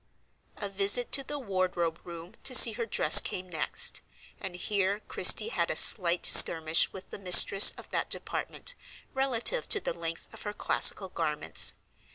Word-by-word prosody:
A 205 - -7
visit 200 +5 +1
to 275 - +1
the 290 +2 -10
wardrobe 185 - -6
room 170 +2 -13
to 265 -1 -1
see 235 - +8
her 230 +1 -8
dress 155 -7 +5
came 185 0 -8
next; 165 -3 -3 0.4
and 190 -3 -9
here 200 +2 -5
Christie 450 - +3
had - - -5
a - - -5
slight 175 -3 +1
skirmish 160 -1 +4
with 190 -1 -15
the - - -10
mistress 195 +1 +5
of - - -15
that - - -5
department - - -5 0.4
relative 265 - -3
to 415 - +3
the - - -6
length 165 0 -9
of - - -14
her 210 - -9
classical 195 -2 -1
garments. 155 -4 -4
195 Hz, 165 wpm, -25 LUFS, 170-230 Hz, 0.4 s, see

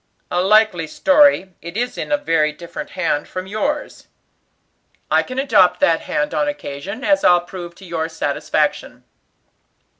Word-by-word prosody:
"A 175 - +1
likely 200 -4 +3
story; 280 - +3
it 170 +4 -7
is 245 +1 -2
in - - -5
a 295 - +3
very 165 - +1
different 170 +3 -8
hand 165 -5 -1
from 185 0 -6
yours." 280 +10 -3 1.0
"I - - +4
can 255 - -8
adopt 185 -10 +3
that 165 -1 +3
hand 300 0 -2
on 295 - 0
occasion, 200 - -6
as 295 +1 +2
I'll 175 -1 +5
prove 175 -1 -9
to 190 - -14
your 165 -2 -3
satisfaction." 150 -3 -2
185 Hz, 150 wpm, -19 LUFS, 170-265 Hz, 1.0 s, I'll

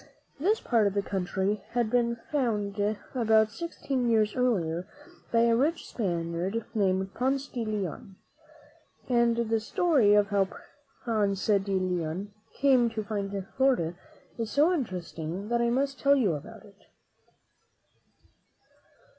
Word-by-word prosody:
This 410 +9 +2
part 225 -4 +2
of 200 - -2
the 200 - +1
country 195 +2 -2
had 235 -3 0
been 235 -1 +2
found 210 -8 -1 0.3
about 220 -3 +3
sixteen 270 -4 -2
years 215 -2 +2
earlier 185 -9 0 0.4
by 230 - +4
a 235 0 +4
rich 310 +7 0
Spaniard 175 +1 -2
named 190 -3 0
Ponce 270 +3 0
de 240 -3 -4
Leon; 200 -3 -4 0.9
and 235 -2 +3
the 225 -1 +1
story 230 - +3
of 205 -1 +3
how 200 -2 +2 0.6
Ponce 205 -4 0
de 200 -2 +2
Leon 185 +1 -2 0.2
came 260 -4 +4
to 220 -1 -4
find 205 -2 -3 0.3
Florida 260 -12 +2 0.5
is 225 -2 -2
so 300 +9 +3
interesting 185 - -4
that 235 0 +1
I 235 - +2
must 275 +2 0
tell 280 0 +4
you 220 -11 +2
about 145 - -8
it. - - -20
220 Hz, 130 wpm, -28 LUFS, 195-245 Hz, 0.9 s, by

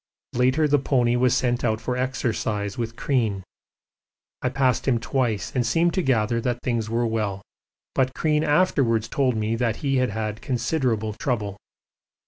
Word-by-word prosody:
Later 130 +5 +3
the 145 0 +3
pony 125 -3 +2
was 125 0 +3
sent 120 -1 0
out 110 -2 +1
for 125 +1 -2
exercise 110 -5 -2
with 115 -1 -4
Crean. 115 -8 0 1.0
I 130 - +1
passed 130 -1 +1
him 120 -3 +3
twice 115 -4 -1
and 125 - +2
seemed 170 +6 +2
to 185 - +1
gather 115 -5 +1
that 120 0 -1
things 115 -3 -1
were 120 +1 +1
well, 105 -3 -2 0.5
but 130 0 +1
Crean 155 -1 +1
afterwards 140 -8 +2
told 130 -1 +1
me 110 +1 0
that 115 -2 0
he 135 -1 +2
had 130 -1 +2
had 110 +1 -4
considerable 120 -4 -1
trouble. 110 -7 -2
120 Hz, 160 wpm, -24 LUFS, 110-130 Hz, 1.0 s, Later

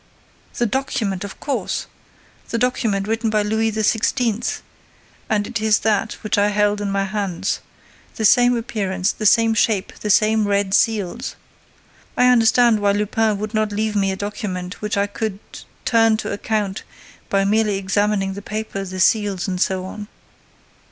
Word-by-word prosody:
"The 240 - +2
document, 215 -5 -2
of 200 - -8
course! 280 - -2 0.6
The 230 - -1
document 225 -5 0
written 225 +1 0
by 215 -1 +1
Louis 220 +1 0
XVI.; 225 +1 0 0.7
and 210 -1 +1
it 235 -1 -4
is 215 -1 +4
that 220 0 +1
which 215 -1 0
I 205 - +4
held 210 0 +1
in 205 - -2
my 195 0 0
hands. 195 -3 -2 0.6
The 220 - -1
same 245 +2 +5
appearance, 195 -4 -1
the 215 - 0
same 225 +1 +4
shape, 210 -3 +1
the 210 - -4
same 215 +1 +3
red 200 -1 0
seals. 220 +3 0 0.8
I 250 0 +5
understand 235 -1 +4
why 200 -1 +2
Lupin 210 +1 +1
would 215 +2 -5
not 215 -1 0
leave 215 +1 -1
me 195 -1 +1
a - - -2
document 195 -2 -5
which 210 -1 -2
I 200 - +2
could 205 0 -4 0.5
turn 225 -2 +4
to - - -4
account 205 -1 -2 0.5
by 195 0 +2
merely 210 0 +2
examining 195 0 0
the 200 - -7
paper, 210 -1 -4
the 185 -1 -6
seals 200 -1 +2
and 185 -2 -2
so 185 -1 0
on." 205 +2 -7
210 Hz, 160 wpm, -20 LUFS, 200-220 Hz, 0.8 s, same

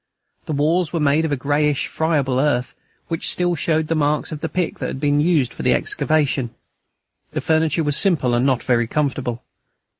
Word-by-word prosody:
The 155 - -2
walls 155 +3 +1
were 170 - -1
made 150 +2 +2
of 160 - -2
a - - +2
greyish, 145 +1 0
friable 145 -5 0
earth, 130 -3 0 0.3
which 165 -1 -1
still 175 -1 +1
showed 160 -1 0
the 165 - 0
marks 150 0 0
of 155 - -5
the 160 - -3
pick 180 -3 -2
that - - -2
had - - -5
been 145 0 +2
used 150 -7 +1
for - - -7
the - - +3
excavation. 145 -5 0 0.8
The - - -1
furniture 160 0 +1
was 145 -1 +1
simple 150 -11 +2
and 120 +1 +2
not 130 -2 +1
very 120 -2 +1
comfortable. 130 -3 -2
150 Hz, 190 wpm, -20 LUFS, 135-160 Hz, 0.8 s, the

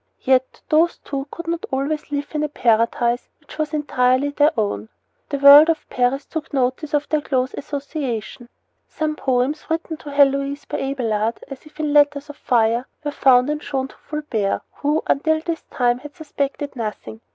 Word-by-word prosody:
Yet 260 -1 +1
these 325 +3 +3
two 275 0 -4
could 340 - -8
not 335 0 -3
always 290 +3 -2
live 285 0 -2
in 300 - -1
a 300 - -1
paradise 235 -1 +1
which 305 0 -15
was 305 -1 -1
entirely 270 -2 +1
their 290 +1 +3
own. 110 - -2 0.4
The 280 - -1
world 285 +3 +9
of 320 -2 -1
Paris 255 +3 0
took 320 -1 -6
notice 270 +2 -1
of 295 0 0
their 305 -1 +1
close 260 -2 -1
association. 275 -5 -5 0.4
Some 310 -1 -2
poems 265 +2 0
written 325 0 -2
to 295 - -10
Heloise 280 0 +2
by - - -4
Abelard, 230 -5 -1
as 275 +2 -10
if 305 - -19
in 300 -2 -1
letters 290 0 +3
of 290 - -18
fire, 235 +1 +1 0.2
were 295 - -2
found 260 -1 +4
and 300 0 -3
shown 265 -2 -3
to - - -17
Fulbert, 270 -10 -2
who, 300 +2 0
until 315 +3 +2
this 330 0 -4
time, 245 -1 +1
had 290 +2 -11
suspected 285 -3 -4
nothing. 220 -1 -6
280 Hz, 175 wpm, -21 LUFS, 255-300 Hz, 0.4 s, world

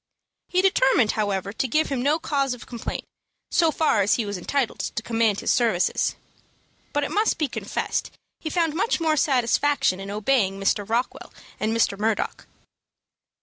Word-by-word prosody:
He 365 0 +2
determined, 265 - +4
however, 200 -2 -2
to 260 - -1
give 305 +6 +1
him 270 -3 -1
no 290 +4 +2
cause 275 -5 -1
of 245 - -12
complaint, 235 -2 -5 0.5
so 335 -2 +4
far 310 -9 +2
as 200 +2 +3
he 230 - -1
was 205 0 -4
entitled 250 +7 -1
to 215 - -3
command 225 -3 +1
his - - +2
services; 225 -7 +1 0.8
but 290 - 0
it - - -3
must 430 +2 +1
be 305 - 0
confessed - - -3 0.3
he 315 - -4
found 330 -2 +1
much 390 +7 0
more 320 -2 +2
satisfaction 270 -5 +2
in 195 0 -7
obeying 205 -2 +1
Mr. 200 +1 0
Rockwell 235 +3 -2 0.3
and 215 - 0
Mr. 225 -3 +1
Murdock. 220 0 -1
245 Hz, 165 wpm, -24 LUFS, 210-295 Hz, 0.8 s, determined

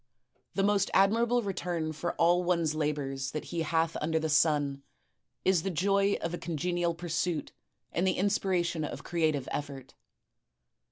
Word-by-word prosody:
The 195 - +2
most 200 -1 +2
admira 215 +5 +4
ble 240 0 +2
return 175 -5 -2
for 175 +3 -3
all 175 +2 +3
one's 170 -3 +1
labors 145 -3 -2
that 155 - -4
he 170 - 0
hath 165 +1 0
imder 160 +1 +1
the 160 0 -2
sun, 145 -2 +2 0.6
is 185 -3 +4
the 195 - -2
joy 195 +3 +2
of 165 +1 -3
a 175 - -3
congenial 170 +1 -1
pursuit 170 -1 -2 0.4
and 175 +3 0
the 185 - +1
inspiration 185 -4 +1
of - - -5
creative 155 -6 0
efifort. 140 -3 -5
170 Hz, 155 wpm, -30 LUFS, 155-185 Hz, 0.6 s, admira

